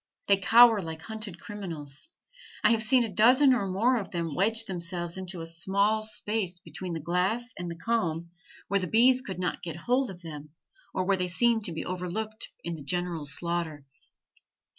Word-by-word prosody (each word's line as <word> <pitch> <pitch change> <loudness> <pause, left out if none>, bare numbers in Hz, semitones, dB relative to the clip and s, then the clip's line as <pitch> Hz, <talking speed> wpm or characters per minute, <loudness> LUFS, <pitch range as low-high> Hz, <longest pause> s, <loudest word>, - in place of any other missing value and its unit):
They 200 - +6
cower 225 +2 +7
like 160 -2 -7
hunted 215 -3 -7
criminals. 165 - -7 0.5
I - - +6
have 225 -1 +3
seen 245 +2 +4
a - - -1
dozen 255 +7 +6
or 205 -6 0
more 225 +7 +2
of 210 - -4
them 170 -3 -3
wedge 225 +7 +1
themselves 175 -2 -4
into 185 -2 -5
a - - -5
small 200 +6 +1
space 210 -3 -2
between 180 0 -6
the - - -3
glass 185 +9 -1
and 175 -1 -4
the 170 - -6
comb, 170 -6 -1 0.4
where 200 - +1
the 185 - -3
bees 250 +6 +5
could 190 -8 -6
not 180 -1 -2
get 165 -3 -5
hold 250 +10 0
of 180 -2 -10
them 150 -2 -8 0.4
or 185 - -1
where 195 0 +2
they 180 0 -1
seemed 225 +4 +2
to - - -2
be 160 - -4
overlooked 185 +5 -4
in 170 - -3
the 155 -3 -7
general 175 -1 -2
slaughter. 165 -2 -2
185 Hz, 185 wpm, -28 LUFS, 170-220 Hz, 0.5 s, cower